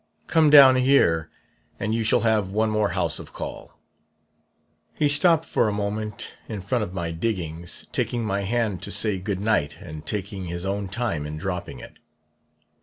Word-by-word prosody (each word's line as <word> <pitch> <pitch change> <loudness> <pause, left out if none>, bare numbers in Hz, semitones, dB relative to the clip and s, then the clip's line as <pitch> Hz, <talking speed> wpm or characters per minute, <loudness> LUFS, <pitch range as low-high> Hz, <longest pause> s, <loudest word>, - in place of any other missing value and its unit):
Come 160 -2 +4
down 135 -3 +9
here, 85 - +3 0.5
and 110 +2 -1
you 115 0 0
shall 110 - +2
have 110 -4 +1
one 110 +1 +1
more 105 -1 +1
house 85 -5 0
of - - -11
call. - - -8 1.2
"He 150 - +2
stopped 160 +3 +3
for 110 - +1
a - - -1
moment 105 +1 -4 0.2
in 105 -3 -4
front 120 +4 -1
of 100 - -5
my 85 -2 -2
diggings, 85 -3 -4
taking 120 -2 -1
my 100 -1 -1
hand 110 -2 -1
to - - -4
say 100 0 +2
goodnight 100 -6 -1
and 80 -3 -9
taking 100 +2 -4
his 85 +1 -5
own 100 +1 -2
time 95 -8 -2
in 75 +1 -6
dropping 90 -6 -5
it. - - -13
100 Hz, 170 wpm, -24 LUFS, 90-115 Hz, 1.2 s, down